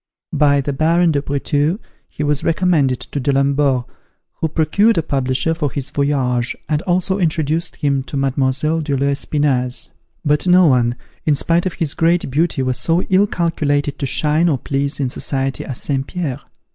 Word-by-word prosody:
By 145 -2 +3
the 140 +1 -3
Baron 165 +4 +2
de 140 -2 0
Breteuil 145 +4 0 0.3
he - - -5
was 145 -1 0
recommended 160 -7 +2
to 145 - -5
D'Alembert, 140 -1 +1 0.5
who 160 - 0
procured 165 +8 +2
a 165 - +1
publisher 135 +2 0
for 155 -3 -2
his 140 0 -5
"Voyage," 130 -4 0
and 150 -1 0
also 185 +2 +1
introduced 160 -1 0
him 140 -2 0
to 140 - -5
Mlle. 135 +4 0
de 145 -2 -1
l'Espinasse. 140 -2 0 0.3
But 150 +4 +1
no 180 0 +6
one, 120 -5 +3 0.3
in 150 - +4
spite 170 +5 +1
of 180 - -3
his 155 -4 -2
great 170 -3 +1
beauty, 155 -1 0
was 130 -1 -1
so 170 +2 +1
ill 195 +2 +4
calculated 145 -6 -1
to 140 - -1
shine 155 +5 +2
or 145 - +1
please 140 +3 -2
in 135 - 0
society 135 +1 -2
as 130 - -5
St. 135 -2 -1
Pierre. 150 -7 -3
145 Hz, 170 wpm, -18 LUFS, 135-165 Hz, 0.5 s, no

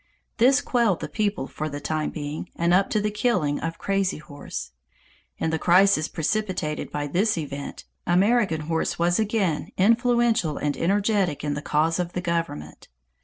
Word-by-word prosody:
This 260 +4 +5
quelled 235 -9 +1
the - - -4
people 210 -8 -1
for 155 +3 -5
the 145 0 -5
time 155 +1 -2
being 150 +3 -5
and 170 +1 +1
up 190 +2 +3
to 215 - +1
the 210 0 -1
killing 195 -10 0
of 165 0 -4
Crazy 195 -1 0
Horse. 145 - -8 0.7
In 160 - -1
the 160 - -1
crisis 180 -2 +4
precipitated 180 -3 -2
by 145 0 -2
this 185 +8 +1
event, 140 -3 -6 0.2
American 190 -1 +3
Horse 160 +1 -1
was 175 +2 +2
again 205 -7 0
influential 230 - +3
and 145 -1 -1
energetic 195 -5 +1
in 145 -1 -1
the 145 - -4
cause 155 +3 +1
of 175 -1 -2
the 180 - -2
government. 165 - -3
175 Hz, 165 wpm, -24 LUFS, 150-210 Hz, 0.7 s, This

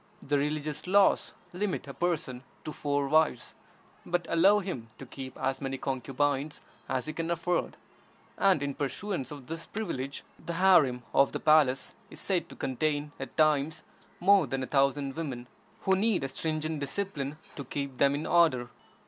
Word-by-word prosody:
The 145 0 0
religious 150 +2 -2
laws 200 +1 +4 0.2
limit 195 +1 -2
a - - -7
Persian 160 -8 -1 0.2
to 155 - -5
four 145 -1 -1
wives, 155 -5 +2 0.5
but 175 -1 -1
allow 195 +5 +6
him 175 - -4
to 135 - -9
keep 130 +1 -8
as 135 +1 -1
many 135 -1 -3
concubines 135 +3 -1 0.3
as 130 - -1
he 155 - -4
can 165 +1 -3
afford; 170 +1 -1 0.6
and, 190 -7 +3
in 140 0 -2
pursuance 145 +3 -3
of 145 -3 -9
this 165 +3 -6
privilege, 145 -11 -4 0.2
the 170 - -4
harem 165 -9 +4
of 140 0 +4
the - - -2
palace 150 -4 +4 0.2
is - - -11
said - - -1
to - - -11
contain 145 +2 -1
at - - -7
times 155 -1 +2 0.4
more 195 +2 +5
than 135 -1 -2
a - - -1
thousand 140 0 +1
women, 135 -7 -4 0.4
who 190 - +3
need 205 -3 +1
a 135 - -2
stringent 155 0 -2
discipline 145 -1 -3 0.2
to 140 - -5
keep 135 0 -5
them 140 0 +4
in 150 - -3
order. 145 -8 +3
150 Hz, 165 wpm, -29 LUFS, 135-170 Hz, 0.6 s, allow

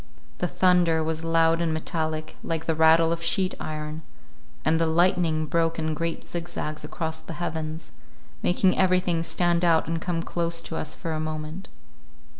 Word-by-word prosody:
The 180 - +1
thunder 175 -3 +3
was 160 0 -2
loud 165 0 +3
and 165 -1 +1
metallic, 160 -1 -3
like 160 -1 -2
the 165 - +1
rattle 160 +1 +5
of 165 0 -1
sheet 185 +2 +1
iron, 155 0 -5 0.6
and 160 +2 +3
the 165 - +3
lightning 165 -1 +2
broke 165 +1 +1
in 160 -1 -1
great 165 +2 -3
zigzags 170 -3 -5
across 160 +1 -4
the - - -8
heavens, 160 -1 -4 0.5
making 185 +1 +2
everything 180 -3 +2
stand 175 +1 +1
out 165 -2 +3
and 165 0 -2
come 165 -1 -2
close 170 -1 -1
to 165 - -7
us 155 - -4
for 165 - -4
a 155 - -2
moment. 155 +3 -5
165 Hz, 165 wpm, -26 LUFS, 160-170 Hz, 0.6 s, rattle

